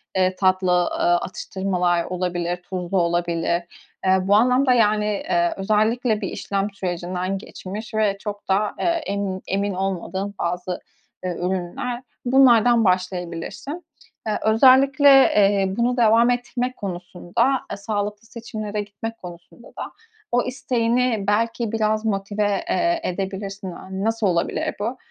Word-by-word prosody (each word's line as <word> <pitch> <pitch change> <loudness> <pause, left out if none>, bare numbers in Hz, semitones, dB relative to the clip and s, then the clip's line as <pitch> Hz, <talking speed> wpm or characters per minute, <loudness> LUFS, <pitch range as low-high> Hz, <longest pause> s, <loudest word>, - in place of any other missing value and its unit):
eee, 185 0 +2
tatlı, 185 -1 +2
ııı, 175 0 +2
atıştırmalar 180 -1 -1
olabilir, 175 -1 -2
tuzlu 180 +1 -4
olabilir. 170 0 0 0.4
Eee, 190 0 +5
bu 195 +2 +3
anlamda, 250 +4 +4
yani, 215 -3 +3
eee, 175 -4 0
özellikle 215 +3 +1
bir 195 - -2
işlem 200 0 -2
sürecinden 180 0 -3
geçmiş 200 +3 -8
ve 215 -2 +1
çok 205 0 -7
da, 205 +2 +1
eee, - - -1 0.2
emin 200 -2 -2
emin 200 +1 -1
olmadığın 195 +1 -3
bazı, 180 +1 -2 0.4
eee, 180 -1 -2
ürünler 190 +8 -3 0.2
bunlardan 245 -3 +5
başlayabilirsin. 185 - -2 0.4
Eee, 215 - 0
özellikle, 265 +5 +6
eee, 200 -8 +5
bunu 245 +1 +1
devam 230 0 +5
ettirmek 245 +1 -2
konusunda, 190 +7 -1
eee, - - -4
sağlıklı 205 +1 -3
seçimlere 215 -3 -5
gitmek 210 +3 -7
konusunda 180 +5 -12
da - - -8 0.4
o 245 +1 +3
isteğini 245 -3 0
belki 230 +2 0
biraz 215 -1 0
motive, 205 -1 0
eee, 340 0 +1
edebilirsin. 195 - -4
Yani, 190 +2 -6
nasıl 225 -1 +1
olabilir 170 -1 -1
bu? 230 +5 -2
200 Hz, 125 wpm, -22 LUFS, 185-230 Hz, 0.4 s, özellikle